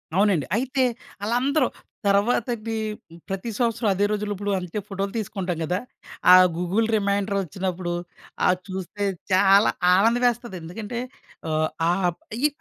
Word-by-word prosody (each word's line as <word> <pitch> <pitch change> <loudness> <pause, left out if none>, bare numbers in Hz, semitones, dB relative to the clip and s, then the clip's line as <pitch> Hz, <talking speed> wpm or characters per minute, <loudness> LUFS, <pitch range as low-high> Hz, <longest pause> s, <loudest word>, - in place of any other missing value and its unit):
అవునండి. 195 -6 +3
అయితే 260 +2 +1 0.4
ఆళ్ళందరూ 255 +5 +2 0.4
తర్వాతకి 225 +2 +1 0.5
ప్రతి 195 +4 -3
సంవత్సరం 230 -2 +1
అదే 200 +2 +1
రోజుల్లో 210 0 -1
ఇప్పుడు 205 +1 -3
అంతే 180 +3 -4
ఫోటోలు 195 0 -3
తీసుకుంటాం 190 -5 -3
గదా! 180 +4 0 0.5
ఆ - - +11 0.2
గూగుల్ 195 +6 +1
రిమైండరొచ్చినప్పుడు 195 -3 -1 0.5
ఆ - - +5 0.2
చూస్తే 190 +2 -5 0.3
చాలా 195 +2 +6 0.2
ఆనందమేస్తది. 235 +1 +2
ఎందుకంటే 210 +8 -6 0.5
ఆహ్, 155 0 +1 0.2
ఆ! - - +4 0.5
ఈ - - +8
200 Hz, 115 wpm, -24 LUFS, 185-230 Hz, 0.5 s, ఆ